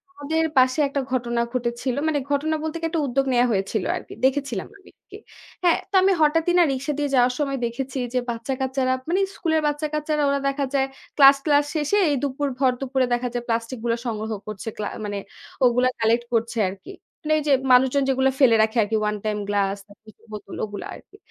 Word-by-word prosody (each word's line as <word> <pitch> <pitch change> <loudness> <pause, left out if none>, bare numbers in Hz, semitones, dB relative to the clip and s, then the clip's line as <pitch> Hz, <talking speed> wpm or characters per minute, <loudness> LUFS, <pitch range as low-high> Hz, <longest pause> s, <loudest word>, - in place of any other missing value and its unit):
আমাদের 315 +3 -1
পাশে 255 +3 +4
একটা 275 0 -2
ঘটনা 240 -2 0
ঘটেছিল। 240 +1 -2
মানে 295 -2 +1
ঘটনা 310 +3 +1
বলতে 315 +1 -3
কি? 330 - -3
একটা 325 -2 -1
উদ্যোগ 270 +2 0
নেয়া 245 0 +4
হয়েছিল 195 0 -1
আরকি। - - -8
দেখেছিলাম 265 -7 -1
আমি 390 - -19
আরকি। - - -14 0.5
হ্যাঁ? 345 - +4
তো 395 - -2
আমি 390 +1 +4
হঠাৎই 325 +3 +3
না? 350 - +7
রিক্সা 270 +3 -2
দিয়ে 290 -1 0
যাওয়ার 250 0 +4
সময় 275 -2 -1
দেখেছি 255 +3 -4 0.2
যে, 255 - +2
বাচ্চাকাচ্চারা, 260 +2 -1 0.2
মানে 365 - +2 0.2
স্কুলের 320 -3 0
বাচ্চাকাচ্চারা 300 0 -1
ওরা 280 0 +1
দেখা 275 0 -1
যায় 270 -1 +2 0.3
ক্লাস-টলাস 285 +1 +6
শেষে, 305 +6 +1
এই 290 - +2
দুপুর, 285 +1 -1
ভর 260 -2 +4
দুপুরে 265 -1 +1
দেখা 240 +1 0
যায় 245 -1 -3
প্লাস্টিক 230 +1 -2
গুল 235 -1 +1
সংগ্রহ 220 -1 -3 0.2
করছে, 215 0 -7
ক্লা 210 - -3 0.2
মানে 205 0 -3 0.5
ওগুলো 250 +1 +3
কালেক্ট 230 +1 +2
করছে 230 +1 0
আরকি। 190 0 -10 0.3
মানে 310 0 0
এই - - -5
যে, 285 - +5 0.2
মানুষজন 265 +2 +4
যেগুলা 265 0 +2
ফেলে 245 -5 +6
রাখে 220 +2 -1
আরকি। 220 +2 -2
ওয়ান 210 0 0
টাইম 210 -1 -1
গ্লাস, 200 -1 +1
প্লাস্টিকের 210 +1 -19
বোতল 210 -1 -8
ওগুলা 205 -2 -7
আরকি। 410 - -17
260 Hz, 190 wpm, -23 LUFS, 235-290 Hz, 0.5 s, না